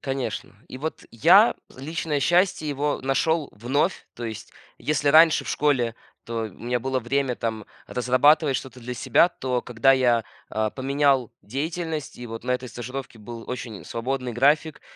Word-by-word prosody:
Конечно. 135 -7 -4
И 130 - -8
вот 160 +4 -5
я 180 - +6 0.2
личное 150 +2 -2
счастье, 175 0 +2
его 145 +1 -1
нашёл 145 +3 +1
вновь. 140 - -1
То 120 - -7
есть, 115 +1 -7 0.3
если 150 -1 0
раньше 160 +2 +6
в - - -8
школе, 130 -6 +1 0.3
то 115 0 -3
у - - -4
меня 120 +5 -3
было 130 +2 -1
время 130 +1 0
там 110 -2 -3 0.2
разрабатывать 135 +4 +3
что-то 130 0 -8
для 125 +1 -5
себя, 170 - +4
то 130 -7 -2
когда 125 +3 +3
я, 120 -4 +3 0.3
э, 110 0 0
поменял 135 -2 +1
деятельность, 155 +5 -4
и 120 - -7
вот 115 0 -7
на 125 - -2
этой 125 0 -1
стажировке 120 +2 -7
был 115 +2 -9
очень 120 -4 -6
свободный 125 +1 -3
график. 150 +5 +2
130 Hz, 160 wpm, -24 LUFS, 120-150 Hz, 0.3 s, я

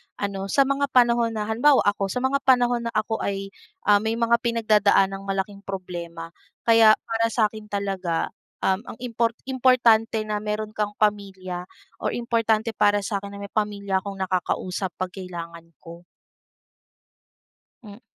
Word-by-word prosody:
ano 195 -1 -4
sa 275 +8 +4
mga 275 +1 0
panahon 235 -3 +3
na 215 - -1
halimbawa 240 +7 +3
ako, 205 -1 +1
sa 250 +6 -3
mga 275 +1 +2
panahon 245 -2 +3
na - - -3
ako 215 +1 0
ay, 195 0 -3 0.3
ah, 205 0 +5
may 220 +2 -1
mga 230 0 -1
pinagdadaang 210 -4 +2
malaking 195 +1 -3
problema. 175 -4 -7 0.3
Kaya 225 -2 +6
para 225 0 0
sa'kin 215 -2 -1
talaga, 195 -5 -2 0.3
um, 190 0 +2 0.2
ang - - -26
impor 230 -1 0
importante 240 -4 +3
na 210 -1 -2
meron 210 0 -3
kang 210 -1 -3
pamilya, 190 -4 -2 0.3
or - - -2
importante 230 -2 0
para 205 -1 +2
sakin 200 -1 -4
na 200 - -8
may 200 - -8
pamilya 200 -2 -1
akong 200 0 -7
nakakausap 185 0 -2
'pag 185 -1 -4
kailangan 170 -3 -8 0.2
ko. 170 0 -11 1.8
M 205 0 -12
210 Hz, 145 wpm, -24 LUFS, 195-230 Hz, 1.8 s, Kaya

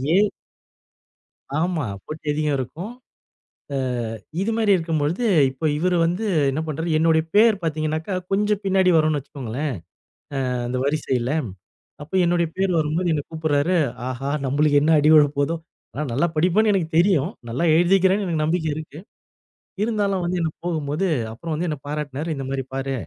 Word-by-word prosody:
ஏ - - +6 1.4
ஆமா, 165 -3 0 0.2
போட்டி 155 0 -8
அதிகம் 150 -1 0
இருக்கும். 170 - -5 0.8
அ - - 0 0.7
இது 225 +3 0
மாரி 215 -3 +3
இருக்கும் 165 -3 -1
பொழுது, 170 +11 0 0.2
இப்போ 135 +4 -6
இவரு 180 +2 +1
வந்து 180 +6 -1 0.3
என்ன 155 +4 -2
பண்றாரு 160 +3 -3
என்னுடைய 160 0 +3
பேர் 220 0 +6
பார்த்தீங்கனாக்கா 155 +3 -2 0.2
கொஞ்சம் 210 +1 +1
பின்னாடி 190 -1 +3
வரும்னு 155 -2 +2
வச்சுக்கோங்களேன், 135 0 -4 0.8
அ - - 0
அந்த 125 +1 -2
வரிசையில 135 -4 0 0.7
அப்போ 160 +6 -6
என்னுடைய 170 -1 +2
பேர் 190 -1 +1
வரும்போது 160 +3 0
என்னை 150 -2 +1
கூப்பிடுறாரு, 155 +2 +1 0.3
ஆஹா 130 +2 -3 0.2
நம்மளுக்கு 145 +2 +3
என்ன 160 +2 +3
அடி 150 +1 +4
விழப்போகுதோ, 145 +1 +4 0.4
ஆனா, 150 - -3
நல்லா 145 +8 +2
படிப்பேன்னு 190 +7 +3
எனக்கு 180 -5 0
தெரியும். 175 -2 +3 0.2
நல்லா 130 +9 -1
எழுதிக்கிறேன்னு 190 +3 +3
எனக்கு 160 -3 -1
நம்பிக்கை 160 0 0
இருக்கு. 155 -1 -8 0.9
இருந்தாலும் 200 -5 0
வந்து 180 +1 -1
எனக்கு 160 -2 -2
போகும்போது 160 +2 -1 0.3
அப்புறம் 160 +7 -5
வந்து 165 +4 -2
என்ன 150 - -2
பாராட்னாரு, 150 +1 -4
இந்த 135 -1 -5
மாரி 135 -1 -2
பாரு 135 0 -2
160 Hz, 150 wpm, -22 LUFS, 145-180 Hz, 1.4 s, ஏ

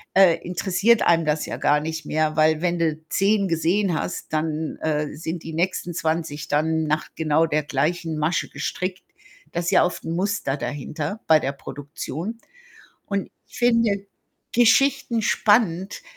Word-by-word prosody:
äh, 190 -3 +6
interessiert 195 +5 +2
einem 165 -1 +3
das 150 0 0
ja - - -4
gar 150 +1 +2
nicht 160 0 -5
mehr. 155 0 0
Weil, 155 0 +3
wenn 175 -1 +1
du 160 -2 0
10 200 0 +2
gesehen 175 +3 +1
hast, 175 - -5
dann, 155 0 -2
äh, 150 -1 -1
sind 165 +2 -5
die 160 - -7
nächsten 175 +1 -1
20 160 -2 -2
dann 160 +2 +1
nach 155 0 -1
genau 160 0 +2
der 155 -1 0
gleichen 155 +3 -1
Masche 160 +4 0
gestrickt. 185 0 -4 0.5
Da 170 - -1
ist 170 +1 -1
ja 195 - +5
oft 180 - -3
'n 165 - -3
Muster 185 -6 -1
dahinter, 150 - -4
bei 160 - +6
der 135 - -2
Produktion 145 - -6 0.7
und 200 -1 -2 0.2
ich - - -12
finde 230 -2 +3
ja 200 - +2 0.6
Geschichten 240 0 +3
spannend, 205 -4 +2
165 Hz, 160 wpm, -23 LUFS, 155-190 Hz, 0.7 s, äh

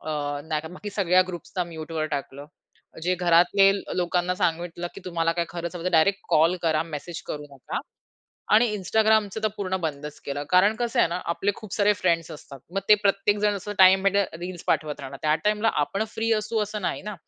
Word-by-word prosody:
अ, 155 - -9 0.4
नाहीतर 155 0 -2
बाकी 205 +3 -7
सगळ्या 185 -2 +3
ग्रुप्सला 180 0 -4
म्यूटवर 160 -1 -4
टाकलं. 140 +1 -8 0.6
जे 180 +2 +1
घरातले 180 +3 +4 0.3
लोकांना 180 0 0
सांगितलं, 175 0 -2
की - - -9
तुम्हाला 165 -2 0
काय 170 0 -1
खरंच 170 0 -5
हवं 170 - -7
तर 180 - 0
डायरेक्ट 190 +4 +3
कॉल 165 +4 +4
करा, 160 -2 +2
मेसेज 165 +1 -7
करू 150 0 -5
नका. 130 - -5 0.7
आणि 225 +3 +6
Instagramचं 215 +1 +1
तर 215 - +3
पूर्ण 190 -2 -2
बंदच 150 -2 -5
केलं. 145 +1 -4
कारण 185 +4 +5
कसं 240 0 -2
आहे - - +5
ना, 170 - -2 0.2
आपले 195 +4 0
खूप 215 -2 -11
सारे 210 0 +4
फ्रेंड्स 170 -4 0
असतात. 140 -2 -11
मग 195 - +1
ते 210 - +9
प्रत्येक 200 +1 +2
जण 210 0 +2
असं 205 +2 -6
टाईम 190 0 +7
भेटेल, 200 +1 +3 0.2
रील्स 180 -1 -6
पाठवत 150 -1 0
राहणार. 135 0 -8
त्या 155 0 +3
टाईमला 210 +1 +2
आपण 195 +8 -2
फ्री 225 +1 -1
असू, 215 +1 0
असं 210 0 -4
नाही - - -2
ना? 210 +1 -5
180 Hz, 195 wpm, -25 LUFS, 165-200 Hz, 0.7 s, ते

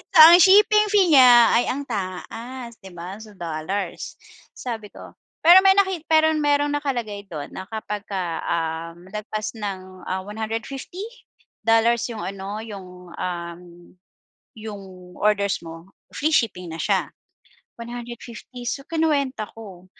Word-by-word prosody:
So - - +7
ang 345 +2 +8
shipping 425 +2 +6
fee 380 -5 +4
niya 245 -3 +8
ay 240 - +4
ang 280 +2 -4
taas 235 +4 -6
'di 190 - -11
ba? 180 +3 -7
So 215 - -13
dollars, 170 +4 -4 0.4
sabi 220 -4 -6
ko, - - -13 0.3
pero 350 +3 +9
may 390 - +7
naki 380 -5 +2
pero 315 0 +5
merong 290 -1 +2
nakalagay 240 -8 -3
dun 150 -4 -7
na 190 - -5
kapag 210 -2 -5 0.4
um 165 +1 -3
lagpas 215 0 -4
ng, 185 -3 -7
ah, 185 - -1
150 225 - -5 0.6
dollars 225 +1 +3
yung 220 - -6
ano, 195 +2 -5
yung, 180 -5 -10
um, 170 -1 -5 1.0
yung 215 -2 -8 0.3
orders 200 -1 +1
mo, 165 +3 -10 0.2
free 310 +2 0
shipping 180 - 0
na - - -6
siya, - - 0 0.7
150 240 +1 -9
so 275 - -2
kinuwenta 285 -8 0
ko. 195 -5 -12
220 Hz, 130 wpm, -23 LUFS, 190-270 Hz, 1.0 s, pero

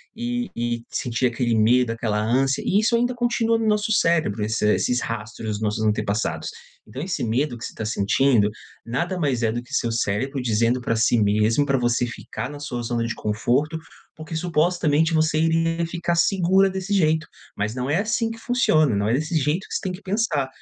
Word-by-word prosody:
e 245 +1 -3
e 120 0 -2
sentia 125 +1 -1
aquele 120 -1 -1
medo, 120 +2 +3
aquela 110 -2 -1
ânsia 130 +5 +1
e 200 - +2
isso 230 +2 +2
ainda 245 +1 +1
continua 235 -1 +1
no 225 - -2
nosso 210 +1 +1
cérebro, 160 - +2
esse 110 +2 -1 0.2
esses 125 0 0
rastros 110 0 -5
dos 105 0 -3
nossos 105 +1 -1
antepassados. 105 -1 -1 0.4
Então 130 +7 -7
esse 180 -4 -3
medo 120 +3 0
que 115 - -7
você - - -7
tá 110 - -6
sentindo, 110 +1 +2 0.4
nada 170 +10 -2
mais 135 -6 0
é 110 - +2
do 120 +1 -3
que - - -15
seu 115 - 0
cérebro 115 +5 -1
dizendo 115 +1 +1
pra 115 - -1
si 115 +1 +3
mesmo 105 +6 +2
pra 135 - +1
você 120 0 +1
ficar 120 +2 -6
na 145 - -8
sua 125 -4 -4
zona 115 0 -1
de 115 - -3
conforto, 125 +9 0 0.4
porque 160 +1 -8
supostamente 160 -1 +1
você 155 0 +2
iria 165 +1 +1
ficar 170 0 -2
segura 190 +2 +3
desse 190 +2 -3
jeito, 160 -4 +2 0.3
mas 105 +2 -1
não 125 +1 -3
é 150 - +2
assim 225 +2 0
que 225 - -8
funciona, 155 - +2
não 100 +1 0
é - - +2
desse 155 +4 -1
jeito 150 +6 -1
que - - -9
você - - -1
tem 190 -3 -3
que 185 - -9
pensar. 190 - 0
135 Hz, 200 wpm, -23 LUFS, 115-175 Hz, 0.4 s, medo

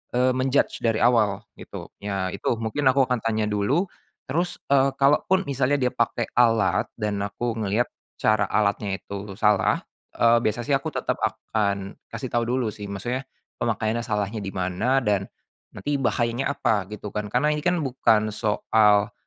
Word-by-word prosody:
eee, 125 +1 +3
men-judge 130 +2 +1
dari 115 -1 +1
awal 110 -5 +3 0.2
gitu. - - -9
Ya 95 -2 -2
itu - - -1
mungkin 115 +6 -1
aku 135 +1 +5
akan 125 -1 0
tanya 110 -1 0
dulu 105 - 0 0.3
terus, 170 +6 -1 0.2
eee, 135 0 +4
kalaupun 150 +7 +3
misalnya 140 -2 +1
dia 125 -3 +1
pakai 120 0 -1
alat 115 -5 +3
dan 105 -3 -2
aku 115 +3 -3
ngelihat 110 +3 0 0.3
cara 110 -2 +2
alatnya 100 -1 0
itu 100 0 -7
salah, 105 -3 +3 0.4
eee, 115 0 +5
biasa 110 +1 0
sih 140 - 0
aku 135 0 +1
tetap - - -1
akan 100 -2 -1 0.2
kasih - - -4
tahu 120 -1 +2
dulu 125 -3 0
sih, 105 - -8
maksudnya 120 +7 -3 0.4
pemakaiannya 115 0 0
salahnya 105 0 -2
di 95 - -4
mana 95 +9 +1
dan 100 -4 +1 0.5
nanti 145 -1 -2
bahayanya 120 +1 0
apa 105 -7 +1
gitu 105 0 -6
kan, 105 0 -3
karena 125 +7 +2
ini 150 - -3
kan 180 0 +2
bukan 110 -6 +2
soal, 105 0 +2
115 Hz, 160 wpm, -24 LUFS, 105-130 Hz, 0.5 s, aku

